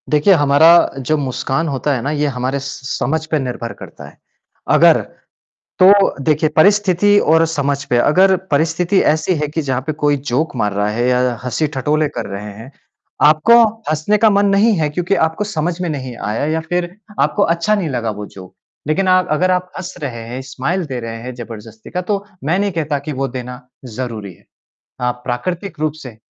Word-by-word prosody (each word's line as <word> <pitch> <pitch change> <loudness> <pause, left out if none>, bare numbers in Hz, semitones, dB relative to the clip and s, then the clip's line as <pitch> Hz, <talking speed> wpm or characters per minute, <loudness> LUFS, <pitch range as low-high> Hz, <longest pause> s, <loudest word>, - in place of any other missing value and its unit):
देखिए, 150 +6 +4
हमारा 145 0 +5 0.3
जो 135 +4 0
मुस्कान 135 +3 -2
होता 140 0 -1
है 120 - -3
ना 140 - -2
ये 150 -1 0
हमारे 130 +2 -1
स - - -9 0.2
स 130 - -3
समझ 160 +4 -1
पे 155 - +2
निर्भर 125 -3 -4
करता - - -11
है। - - -16 0.6
अगर - - +6 0.8
तो 195 +1 +5
देखिए, 155 +2 +2
परिस्थिति 205 +2 +4
और 160 +1 +3
समझ 145 -3 -1
पे 120 - +2
अगर 185 +10 +4 0.2
परिस्थिति 165 +6 +1
ऐसी 160 +4 -1
है 150 -1 -2
कि 155 +2 -3
जहाँ 130 -3 -2
पे 155 - -1
कोई 145 -1 +3
जोक 145 +4 -1
मार 105 -4 -1
रहा 105 +1 0
है 120 +3 -1
या 125 0 +2 0.2
हँसी-ठटोले 150 +3 0
कर - - -3
रहे 100 +1 -6
हैं, 115 +6 -12 0.5
आपको 155 +11 +6 0.3
हँसने 155 +7 +1
का 220 +1 +4
मन 200 0 +3
नहीं 220 +3 +4
है 155 -1 +1
क्योंकि 175 +5 -1
आपको 160 +5 0
समझ 175 -3 -3
में 175 - -2
नहीं 130 -5 -5
आया 105 +6 -2
या 160 - 0
फिर 175 0 -2 0.3
आपको 205 - +2
अच्छा 170 +5 +1
नहीं 185 -6 -2
लगा 120 -4 -2
वो 105 0 -7
जोक। 95 -2 -13 0.3
लेकिन 185 +5 +1
आप 185 0 +3
अगर 180 +4 +2
आप 180 0 -1
हँस 185 -1 -6
रहे 120 -4 -4
हैं, 125 +2 -5
स्माइल 135 +8 -3
दे 130 -4 -5
रहे 115 -1 -6
हैं 125 +1 -6
ज़बरदस्ती 110 -2 -10
का, 180 - -2
तो 200 +2 -2 0.2
मैं 160 +6 +1
नहीं 200 0 0
कहता 155 -4 -2
कि 145 +2 -6
वो 135 0 -2
देना 125 0 -7 0.2
ज़रूरी 110 -5 -6
है। - - -24 0.6
अ, 125 0 +1
प्राकृतिक 170 +9 -4
रूप 155 -1 0
से, 125 -5 -10
150 Hz, 195 wpm, -17 LUFS, 125-175 Hz, 0.8 s, अगर